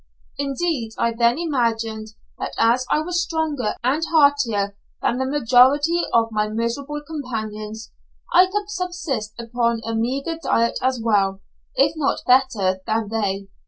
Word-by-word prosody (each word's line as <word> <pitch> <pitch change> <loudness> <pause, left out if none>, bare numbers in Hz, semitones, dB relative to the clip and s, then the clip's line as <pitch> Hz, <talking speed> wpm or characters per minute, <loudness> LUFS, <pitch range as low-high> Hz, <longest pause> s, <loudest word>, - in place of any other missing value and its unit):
Indeed, 275 -4 -2
I 235 - +1
then 235 +2 +2
imagined 225 -8 -1 0.2
that - - -4
as 245 +3 +3
I 305 - +2
was 350 +2 -1
stronger 310 -9 -2
and 275 +6 +1
heartier 275 -10 +3 0.2
than 245 - 0
the 260 - 0
majority 285 +5 +4
of 225 -1 +2
my 210 -1 0
miserable 270 +7 -3
companions, 220 -7 -6 0.4
I 365 +1 +7
could 410 +2 -3
subsist 350 - -3
upon 235 0 -1
a 225 - -3
meagre 270 +8 -2
diet 235 -6 +1
as 255 -1 +1
well, 200 -4 +1 0.3
if 285 +3 +3
not 300 -3 -1
better, 225 -8 +3
than 220 -1 0
they. 200 -3 -2
245 Hz, 140 wpm, -22 LUFS, 225-295 Hz, 0.4 s, I